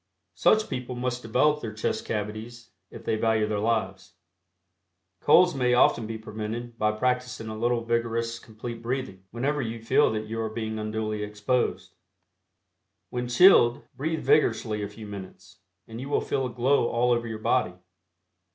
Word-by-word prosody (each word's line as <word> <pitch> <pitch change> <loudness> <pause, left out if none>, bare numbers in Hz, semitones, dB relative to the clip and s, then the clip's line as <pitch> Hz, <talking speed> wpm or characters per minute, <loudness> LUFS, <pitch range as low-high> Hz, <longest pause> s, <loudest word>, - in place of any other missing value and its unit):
Such 215 0 +3
people 125 0 -5
must 125 0 -2
develop 145 +7 +2
their 110 -2 -6
chest 110 - -2
cavities 110 +2 -5 0.2
if - - -11
they 110 - 0
value 110 -1 +2
their 105 -1 -2
lives. 100 -5 -2 1.0
Colds 180 +4 +5
may 125 -3 +2
often 120 -2 +3
be 110 0 -4
prevented 110 +2 -6
by 105 0 +2
practicing 125 0 -1
a 110 - -5
little 120 +1 0
vigorous 115 0 -1
Complete 115 +1 -8
Breathing 115 -6 -4
whenever 140 +5 -1
you 115 -2 -4
feel 115 - +3
that 110 0 -3
you 115 +1 -4
are 110 - -2
being 110 0 -4
unduly 110 0 -3
exposed. 105 +4 -1 1.2
When 125 0 -3
chilled, 120 -3 +6
breathe 160 +3 -2
vigorously 110 -6 +2
a 100 - -2
few 110 +1 -10
minutes, 95 -1 -10 0.3
and 115 +1 -8
you 135 - -6
will - - +2
feel 135 -2 -1
a - - -6
glow 125 +1 +2
all 120 +1 +1
over 120 -1 +1
your 110 -1 -4
body. 110 -3 +1
115 Hz, 160 wpm, -26 LUFS, 110-125 Hz, 1.2 s, chilled